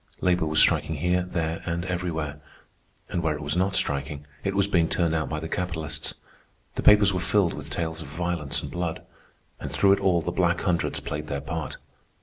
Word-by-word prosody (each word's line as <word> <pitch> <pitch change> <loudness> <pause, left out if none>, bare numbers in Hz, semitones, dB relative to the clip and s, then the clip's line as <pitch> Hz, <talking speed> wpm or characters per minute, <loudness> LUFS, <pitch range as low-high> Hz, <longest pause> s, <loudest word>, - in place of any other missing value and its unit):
Labor 90 -3 +2
was 75 0 -1
striking 80 - +4
here, 90 +4 +1
there, 85 -2 -2
and 85 +1 -2
everywhere; 80 -5 -3 0.7
and 85 - -1
where 80 -2 +1
it 75 - -6
was 75 +3 0
not 95 +2 +1
striking, 70 +1 0 0.2
it 100 0 -1
was 100 -1 +3
being 85 -5 +2
turned 85 -2 +1
out 80 -1 0
by 80 - -2
the 80 - -5
capitalists. 80 -4 -3 0.6
The - - -3
papers 105 -2 +6
were 90 - 0
filled 95 0 +2
with 70 -1 -8
tales 80 +1 -3
of 80 - -8
violence 80 0 -2
and - - -6
blood. 85 -2 -3 0.5
And - - -5
through 100 - +4
it 100 - +4
all 95 -3 +3
the 85 - -2
Black 85 -1 +1
Hundreds 90 -3 0
played 75 +1 -4
their 70 -1 -2
part. 80 +2 -4
85 Hz, 200 wpm, -26 LUFS, 75-90 Hz, 0.7 s, papers